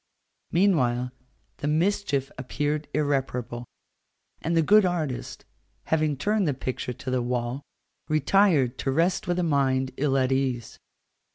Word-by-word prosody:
Meanwhile, 125 -10 +2 0.5
the 145 - -3
mischief 155 -4 0
appeared 145 +3 -2
irreparable, 130 -5 -1 0.8
and 165 +1 0
the 165 - +4
good 210 +6 +6
artist, 165 -8 -3 0.4
having 155 -3 0
turned 205 +5 +1
the 145 - 0
picture 130 -1 -4
to 130 +2 -6
the 130 -1 +1
wall, 120 +2 -2 0.5
retired 155 -4 +3
to - - -1
rest 170 +7 +1
with 175 0 0
a 180 - +1
mind 135 -4 +1
ill 135 -1 +1
at 130 0 +1
ease. 130 -3 -1
140 Hz, 130 wpm, -26 LUFS, 130-165 Hz, 0.8 s, good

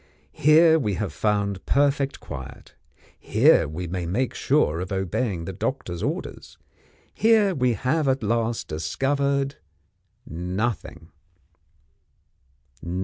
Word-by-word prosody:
Here 160 +2 +5
we 105 -8 -1
have 105 -1 -3
found 100 -2 -1
perfect 140 0 +1
quiet; 65 -1 -9 0.5
here - - +4
we 80 +4 -5
may 85 0 -4
make 120 +9 -1
sure 80 +3 +1
of 90 +2 -5
obeying 95 -1 -2
the - - -5
doctor's 85 -1 -4
orders; - - -5 0.6
here 215 -3 +3
we 125 -6 +1
have 140 +8 0
at 130 -2 +1
last 115 +1 -1
discovered 140 - -1 0.7
Nothing." 90 +1 -4
110 Hz, 105 wpm, -24 LUFS, 90-140 Hz, 0.7 s, Here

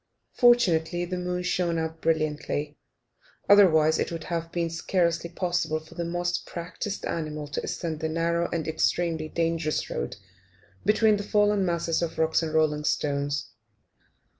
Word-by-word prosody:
Fortunately 175 -8 +3
the 180 +1 -4
moon 180 0 -2
shone 175 -2 0
out 160 0 -3
brilliantly, 150 -2 -1 0.7
otherwise 160 -6 +6
it - - -1
would 165 -1 -5
have 165 -1 -3
been 170 -1 -1
scarcely 170 0 0
possible 175 -3 -1
for 160 +1 -16
the 170 0 -3
most 175 +1 -2
practised 180 +4 -5
animal 155 -2 -3
to 145 - -3
ascend 160 -3 -4
the 160 - -2
narrow 170 +1 0
and 165 -2 -3
extremely 160 0 0
dangerous 165 -2 -1
road - - -3 0.7
between 215 +1 +4
the 205 - -4
fallen 205 -1 +2
masses 170 -1 0
of 170 -2 -3
rock 160 +1 +2
and 160 -1 -3
rolling 150 -1 +2
stones. 145 -1 -1
165 Hz, 145 wpm, -26 LUFS, 160-175 Hz, 0.7 s, otherwise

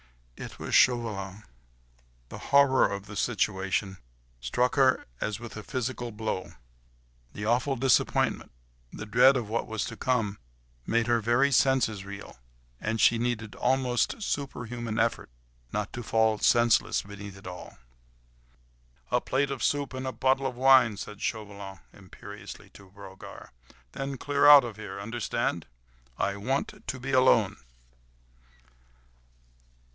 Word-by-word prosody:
It - - -9
was - - -6
Chauvelin! 105 -5 +2 0.9
The - - -8
horror 140 -6 +5
of 100 0 -5
the 105 0 -10
situation 95 -3 -1 0.4
struck 125 - 0
her 135 -2 +3 0.2
as 110 0 -2
with 120 -2 -9
a 110 - -6
physical 120 +1 -4
blow; 105 -3 -4 0.8
the 105 - -5
awful 125 +5 +1
disappointment, 130 0 +1 0.4
the - - -7
dread 130 +6 +5
of 120 -4 -3
what 115 +2 -2
was 110 -2 -3
to 115 - -7
come, 115 -5 -1 0.5
made 115 0 +2
her 120 -1 +2
very 120 +6 +2
senses 130 -6 +2
reel, 100 -9 -10 0.4
and 110 +1 -2
she 115 +1 +4
needed 115 -3 -2
almost 130 - 0
superhuman 120 - -4
effort, 115 +1 0 0.4
not 105 0 -3
to 120 - -5
fall 110 -2 +1
senseless 120 -1 +3
beneath 100 -1 -10
it 95 - -15
all. 90 0 -9 1.3
"A - - +2
plate 135 +1 0
of 135 - -4
soup 145 -2 0
and 130 0 -4
a - - -2
bottle 135 +1 +1
of 125 - -5
wine," 130 -4 +5
said 105 0 -8
Chauvelin 100 -3 -5 0.2
imperiously - - -11
to 100 -2 -16
Brogard, 95 -1 -12 0.4
"then 135 - -5
clear 145 +2 +2
out 145 -2 +10
of 115 -4 -7
here—understand? 110 +2 -3 0.5
I 100 +1 -1
want 130 +7 -3
to 130 - -4
be 135 +2 -5
alone." 115 -6 +4
115 Hz, 135 wpm, -28 LUFS, 105-130 Hz, 1.3 s, out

